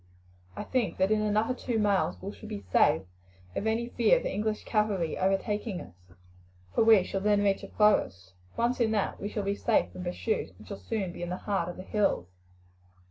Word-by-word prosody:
I - - -4
think 235 -9 -1
that 190 +2 +2
in 215 0 +3
another 215 +3 +1
two 245 -2 -3
miles 195 - +1
we - - -6
shall - - -11
be 100 -1 -6
safe - - +4 0.5
from 210 - -2
any 230 +2 0
fear 245 - +4
of - - -4
the - - -2
English 215 +2 -2
cavalry 205 -7 0
overtaking 195 +1 -1
us, - - -11 0.8
for - - +3
we 220 -4 +7
shall 195 +1 -3
then 205 0 +3
reach 195 -1 +2
a - - -8
forest. 95 - +1 0.2
Once 240 +2 +1
in 230 -2 +3
that 205 -2 -1
we 205 - -4
shall 210 -1 -3
be 200 0 0
safe 220 +2 +1
from 180 - -7
pursuit, 180 - -2
and 105 0 -15
shall 95 - -7
soon 190 - -3
be 175 - -9
in 175 - -3
the 180 - -3
heart 195 -5 -1
of 175 - -7
the 185 - -7
hills." 200 - 0
205 Hz, 210 wpm, -29 LUFS, 180-220 Hz, 0.8 s, we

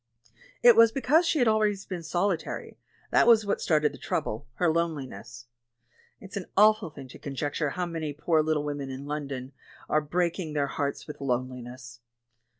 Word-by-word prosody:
It 240 -2 +9
was 230 0 +7
because 300 +7 +3
she 325 - +2
had 245 -4 +3
always 210 -2 +2
been 180 -3 -5
solitary; 175 +1 -2 0.3
that - - +4
was 225 -3 +6
what 200 - -1
started 150 -2 +2
the 135 - -11
trouble 110 0 -3
— - - -39
her 175 - +1
loneliness. 135 -9 -3 0.7
It's 195 +1 -11
an 195 -3 -4
awful 215 -2 +5
thing 140 -3 -11
to - - -12
conjecture 145 +2 -2
how 180 +5 -2
many 165 -3 -4
poor 155 +2 +1
little 155 -1 0
women 145 -2 -4
in 135 +1 -7
Lon 145 0 -3
don 130 -1 -6 0.4
are 155 - +2
breaking 170 +1 -1
their 145 -2 +1
hearts 140 0 -3
with 150 - -9
lonehness. 125 -1 -4
155 Hz, 175 wpm, -27 LUFS, 140-195 Hz, 0.7 s, It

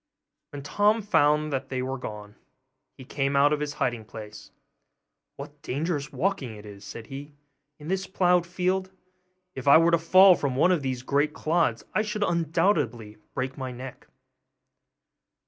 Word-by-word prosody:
When 145 -1 -8
Tom 210 +7 +2
found 150 -6 +2
they 130 -1 -3
were 130 +1 -4
gone, 105 -3 -8 0.6
he 130 - -11
came 140 +1 -1
out 145 +2 +4
of 150 - -1
his 150 -1 -3
hiding 120 -5 -2
place. 105 -1 -10 0.9
'What 145 +1 -10
dangerous 145 +1 -3
walking 140 - -2
it 105 0 -12
is,' 100 -1 -11
said 115 +3 -9
he, 145 +3 -9 0.4
'in 150 - -11
this 190 +2 -2
ploughed 180 -2 +2
field! 185 +1 -1 0.6
If 130 +1 -7
I 140 - +9
were 165 +1 +4
to 170 - +3
fall 185 +3 +7
from 140 -6 -2
one 170 +7 +4
of 175 -5 +1
these 130 -2 -3
great 145 +3 +1
clods, 155 -9 0
I - - +2
should 210 -1 -2
undoubtedly 150 - 0 0.2
break 130 +2 -3
my 130 -1 -4
neck. 125 +1 -10
145 Hz, 160 wpm, -26 LUFS, 130-170 Hz, 0.9 s, I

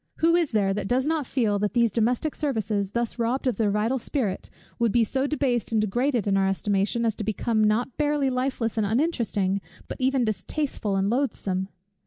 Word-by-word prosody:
Who 330 +1 +3
is 340 -4 +2
there 200 -3 +2
that 195 -1 -3
does 255 +4 +1
not 310 -4 0
feel 215 -6 +1
that 210 +3 -1
these 235 -2 +3
domestic 240 +7 0
services, 215 -8 -1
thus 235 0 -2
robbed 240 +4 0
of 250 -6 0
their 220 -3 +2
vital 215 +6 0
spirit, 230 -6 -2 0.3
would 235 -2 +2
be 235 +1 +4
so 265 +5 -1
debased 260 -7 0
and 225 - +2
degraded 240 +3 0
in 195 -1 +2
our 195 0 +2
estimation, 200 +4 0
as 225 - +2
to - - -3
become 215 +1 0
not 220 +4 +1
barely 290 -3 +1
lifeless 250 -3 -1
and 215 - +2
uninteresting, 220 - 0 0.3
but - - -7
even 260 -1 +2
distasteful 215 - -2
and 195 +2 +1
loathsome? 200 -8 -1
230 Hz, 195 wpm, -25 LUFS, 205-265 Hz, 0.3 s, be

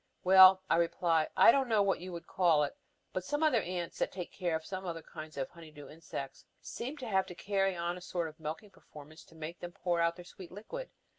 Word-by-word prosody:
"Well," 190 0 +8
I - - +3
reply, 165 -1 +2
"I - - +9
don't 270 0 +1
know 215 -3 +4
what 195 -1 +1
you 185 +1 -7
would 170 -1 -7
call 170 -5 +3
it, 145 - -3 0.4
but 185 - -2
some 290 +10 -1
other 270 -8 +4
ants 175 -2 -5
that - - 0
take 180 -2 -6
care 175 -4 -1
of 160 0 -4
some 190 0 -5
other 165 -3 -5
kinds 155 -2 -10
of 135 - -2
honey 165 -2 -13
dew 150 -1 -12
insects 150 -3 -8 0.2
seem 265 +6 -6
to 255 -4 -7
have 190 -3 +1
to 180 - -9
carry 195 0 0
on 175 +1 -2
a - - -10
sort 175 -2 -3
of 155 0 -12
milking 160 +7 -6
performance 155 -3 -14
to 165 - -19
make 160 +2 -7
them 175 0 -7
pour 175 -1 -1
out 170 0 +2
their 175 - -11
sweet 185 -1 -12
liquid. 360 - -7
175 Hz, 240 wpm, -32 LUFS, 165-190 Hz, 0.4 s, I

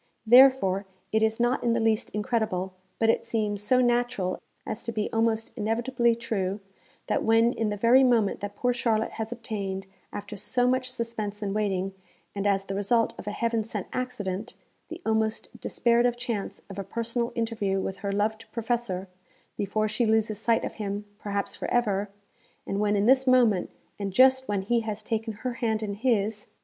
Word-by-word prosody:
Therefore 230 -6 +6 0.2
it 220 - +2
is 220 +1 +1
not 240 +2 +1
in 235 -1 +2
the 235 - +1
least 225 -1 +1
incredible, 210 -4 -1 0.2
but 225 0 +4
it - - -2
seems 215 -3 -1
so 250 +5 +3
natural 240 -6 0 0.2
as 215 - -4
to 230 - -3
be 215 -1 -2
almost 225 0 0
inevitably 235 +2 +1
true, 205 -4 -2 0.5
that - - 0
when 225 +2 +4
in 220 -2 -1
the 205 - -2
very 240 +5 +6
moment 230 -6 +3
that 205 0 -6
poor 245 +3 +1
Charlotte 225 -2 0
has 220 0 -5
obtained, 200 -5 -4 0.3
after 205 +1 -6
so 245 +5 0
much 255 0 +1
suspense 225 -4 -4
and 195 -1 -2
waiting, 195 -2 -1 0.4
and 200 0 -1
as 195 -1 +1
the 195 - -4
result 215 +4 +1
of - - -9
a - - -1
heaven 230 +1 0
sent 210 -3 -5
accident, 220 -4 -3 0.3
the 335 +2 -8
almost 220 0 -1
despaired 235 0 +2
of 240 0 -1
chance 235 -5 -4
of 200 0 -7
a - - -2
personal 235 +3 -2
interview 225 -4 -1
with 190 0 -3
her 200 -2 -3
loved 215 +2 -1
Professor, 230 -5 -2 0.5
before 215 +2 0
she 220 +2 0
loses 220 -1 +1
sight 230 +1 +2
of - - -5
him, 205 0 -3
perhaps 200 -1 -3
for - - -4
ever, 210 -4 +1 0.6
and 195 - -2
when 210 0 +2
in 200 0 +2
this 260 +2 +4
moment, 240 -7 +4 0.3
and 200 -2 -3
just 260 +3 +5
when 200 -2 -1
he 235 +4 +2
has 220 -2 -4
taken 225 0 -2
her 250 -1 -1
hand 220 -2 0
in 205 -1 -2
his 215 -2 0
220 Hz, 185 wpm, -27 LUFS, 205-235 Hz, 0.6 s, Therefore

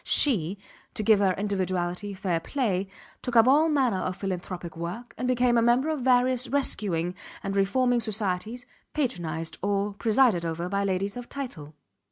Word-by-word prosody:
She, 200 - +3 0.4
to 215 - -2
give 215 -1 +5
her 195 -2 +3
individuality 185 -1 -2
fair 185 -3 -1
play, 200 - -1 0.3
took 250 -2 -4
up 230 +1 +7
all 300 +5 +5
manner 260 -10 +2
of 185 0 -2
philanthropic 180 -3 -5
work 175 +9 -6
and 250 - -3
became 245 -1 +3
a - - +3
member 240 +6 +3
of 310 -4 -1
various 250 0 +3
rescuing 185 -11 -1 0.3
and 195 0 -3
reforming 245 +5 +2
societies 215 +2 -2 0.3
patronized 170 - -2
or 200 +1 0
presided 220 -3 +3
over 170 +1 -3
by 200 0 0
ladies 195 +2 -1
of 245 -1 -8
title. 160 - -7
205 Hz, 160 wpm, -27 LUFS, 185-245 Hz, 0.4 s, up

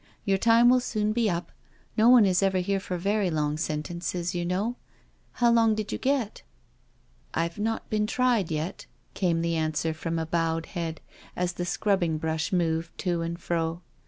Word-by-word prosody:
Your 195 -1 +2
time 230 +2 +5
will 250 +1 +6
soon 215 -3 -1
b^ 225 -3 +2
up— 170 0 -4 0.4
no 225 +2 +5
ouQ 245 -4 +8
is 185 -1 +2
ever 195 -1 +2
here 195 +2 0
for 185 -2 -4
very 200 +2 +1
long 150 -2 0
sentences, 170 +3 -3
you 175 -1 -2
know. 195 +7 -1 0.6
How 240 -1 +3
long 225 -2 +4
did 215 -1 -4
you - - -3
get?'^ 260 -6 -1 0.9
"I've 170 +4 -1
not 225 +2 -2
been 210 -1 +1
tried 240 -6 +1
yet," 160 +4 -4 0.3
came 170 -3 0
the 170 0 0
answer 160 0 0
from 165 +1 -3
a 160 - -1
bowed 165 0 0
head, 165 -3 -5 0.3
as 180 0 -1
the 175 - -3
scrubbing 175 -4 +1
brush 160 +3 -2
moved 165 -2 0
to 175 -3 0
and 170 +1 -4
fro. 165 0 -2
180 Hz, 180 wpm, -27 LUFS, 165-215 Hz, 0.9 s, ouQ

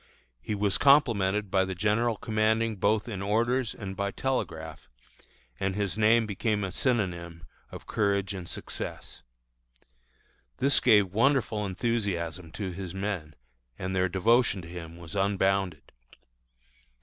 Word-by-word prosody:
He 105 - -3
was 100 -1 0
complimented 105 -8 +3
by 95 -1 +3
the 95 0 -4
general 110 +4 +1
commanding 110 0 +1
both 105 +4 +1
in 100 -5 -5
orders 115 +4 0
and 95 -3 -6
by 100 +1 -1
telegraph, 80 - -4 0.7
and 95 0 -1
his 100 -1 -1
name 110 +1 +4
became 105 0 -1
a 95 - -3
synonym 90 -8 -1 0.3
of - - -9
courage 100 -2 0
and 90 -3 -6
success. - - -6 1.4
This 140 +1 +4
gave 105 -6 +4
wonderful 115 -2 +2
enthusiasm 90 -6 -2
to 100 -3 -4
his 90 0 -6
men, 95 -7 -4 0.4
and 95 0 -3
their 95 0 +2
devotion 100 +1 +2
to - - -10
him 85 -1 -8
was 85 +1 -10
unbounded. 95 -6 0
100 Hz, 130 wpm, -28 LUFS, 95-110 Hz, 1.4 s, name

